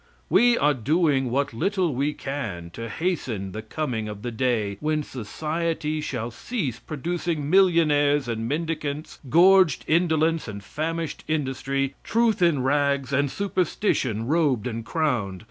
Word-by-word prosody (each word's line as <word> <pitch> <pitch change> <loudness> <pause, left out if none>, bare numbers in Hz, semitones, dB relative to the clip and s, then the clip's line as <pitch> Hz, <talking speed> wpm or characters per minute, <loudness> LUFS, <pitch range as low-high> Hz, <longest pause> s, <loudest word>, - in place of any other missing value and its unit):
We 240 0 +5
are 150 0 +3
doing 140 0 +1
what 140 +2 0
little 185 - 0
we 140 +4 0
can 105 -12 -5
to 115 +5 -6
hasten 125 - -2
the 110 - -5
coming 110 -2 -3
of 105 -1 -8
the 120 - -3
day 110 -4 0
when 155 0 0
society 155 +6 -3
shall 120 -5 -4
cease 140 - -3
producing 160 0 -3
millionaires 150 -7 +4
and 115 -1 -3
mendicants 150 -1 -3
gorged 180 0 +5
indolence 160 -1 +2
and 100 -2 -7
famished 160 +7 -4
industry 135 -2 -1
truth 225 -3 +1
in 160 -7 +3
rags, 140 -1 +1
and 140 +1 +2
superstition 175 - -1
robed 145 -6 +1
and 115 -2 -4
crowned. 120 - -1
145 Hz, 135 wpm, -25 LUFS, 120-165 Hz, -, We